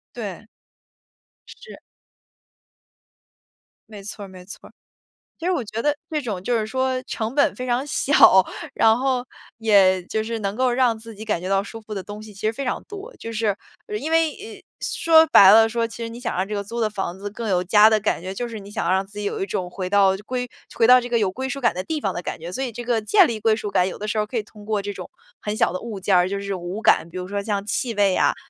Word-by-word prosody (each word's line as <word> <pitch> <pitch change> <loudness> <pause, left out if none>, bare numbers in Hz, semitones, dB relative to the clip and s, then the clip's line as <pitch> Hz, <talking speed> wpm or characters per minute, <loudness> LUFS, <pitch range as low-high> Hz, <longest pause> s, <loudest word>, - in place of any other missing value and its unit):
对。 215 -2 -7 1.0
是。 475 - -12 2.1
没 210 -2 -10
错 205 0 -7
儿 - - -11
没 185 -1 -13
错 200 - -11
儿。 - - -25 0.7
其 330 - -5
实 370 - +2
我 275 -9 -1
觉 215 +1 -5
得 295 +3 +1
这 310 -1 -1
种 210 -9 -4
就 240 +1 +1
是 215 - -2
说 260 +2 -1
成 225 -1 -4
本 285 0 +3
非 255 - -5
常 250 +3 0
小， 260 -9 +5 0.3
然 220 0 +5
后 255 -1 0 0.3
也 200 -5 +4
就 220 +4 -2
是 230 +1 -4
能 200 -1 -2
够 255 +2 +1
让 240 -2 +2
自 225 0 -11
己 215 +2 -9
感 210 -6 -1
觉 185 - -5
到 195 0 +2
舒 225 +2 -9
服 215 -1 -8
的 195 - -4
东 205 +2 -9
西 215 -1 -12
其 195 - -13
实 220 - +1
非 275 - -5
常 250 - -3
多。 415 +4 -10
就 230 - -7
是， 215 -3 0 0.3
呃 420 - -4
因 320 -7 -4
为 325 -1 +3
哎， 430 +2 -11 0.2
说 320 -1 +4
白 195 -1 +8
了 225 +2 +7
说， 230 +1 -1
其 230 +1 -9
实 230 - -4
你 235 +1 -9
想 245 - -3
让 185 - 0
这 210 - -5
个 200 - -2
租 230 +4 -7
的 220 -2 +1
房 190 -3 -4
子 205 +1 -6
更 225 +2 -5
有 180 -2 +1
家 210 +3 +6
的 220 -1 +3
感 205 - 0
觉， 185 +2 -6
就 240 +5 -3
是 230 -2 -7
你 200 0 -12
想 185 -3 -1
让 190 +1 +1
自 200 +1 -12
己 210 - -4
有 200 - -2
一 - - -1
种 180 -2 -3
回 185 0 -4
到 195 -1 +4
就 195 - -8
归 250 0 -3 0.3
回 225 - +3
到 250 +1 +8
这 245 - -6
个 240 -1 +1
有 200 -4 0
归 260 +5 -4
属 275 - -4
感 245 -3 +2
的 185 - -3
地 305 +8 -4
方 195 - 0
的 - - -4
感 - - -5
觉， 170 +2 -8
所 265 - -3
以 255 - -2
这 240 +2 -7
个 235 -1 +1
建 375 - +5
立 225 -6 -4
归 220 0 +3
属 210 -2 -5
感， 180 -1 +2
有 - - -7
的 210 - -5
时 215 +1 -2
候 210 - +1
可 235 +3 -6
以 220 - 0
通 210 0 -16
过 210 -2 -1
这 205 +1 -4
种 185 -2 -9 0.3
很 210 0 -3
小 - - +2
的 185 - -4
物 225 -4 -6
件 190 +1 +1
儿， 180 0 +4
就 200 +1 -3
是 200 0 -4
5 180 +4 -5
感， 170 - +4
比 170 - -12
如 180 0 -4
说 200 +1 -3
像 200 -1 -2
气 230 +3 -2
味 200 -2 +3
啊， - - +2
215 Hz, 285 characters per minute, -22 LUFS, 195-245 Hz, 2.1 s, 白